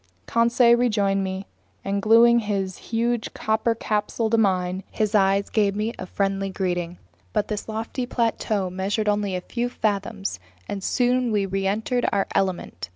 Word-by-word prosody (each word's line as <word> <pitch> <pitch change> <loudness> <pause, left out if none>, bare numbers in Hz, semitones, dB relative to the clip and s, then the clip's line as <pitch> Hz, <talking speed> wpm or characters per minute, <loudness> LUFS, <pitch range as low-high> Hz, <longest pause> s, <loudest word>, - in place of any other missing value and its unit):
Conseil 235 +1 +4
rejoined 205 -5 +1
me, 190 +1 -4 0.4
and 200 +1 -1
gluing 230 +3 +6
his 195 -4 -2
huge 235 0 -1
copper 220 +1 0
capsule 220 +1 -1
to 230 - +4
mine, 185 -2 +1
his 215 0 -1
eyes 195 -1 +3
gave 205 -2 +2
me 215 +3 -1
a 185 - -5
friendly 195 0 -1
greeting. 180 -2 -2 0.4
But 205 - 0
this 210 0 -4
lofty 225 +3 -3
plateau 220 -6 0
measured 200 +4 -1
only 205 -2 +1
a 180 - -2
few 240 +5 -3
fathoms, 200 - -2 0.3
and 195 -1 -5
soon 250 +1 +1
we 205 -2 +1
reentered 195 +6 0
Our 200 -1 +1
Element. 175 - -2
205 Hz, 155 wpm, -24 LUFS, 195-230 Hz, 0.4 s, gluing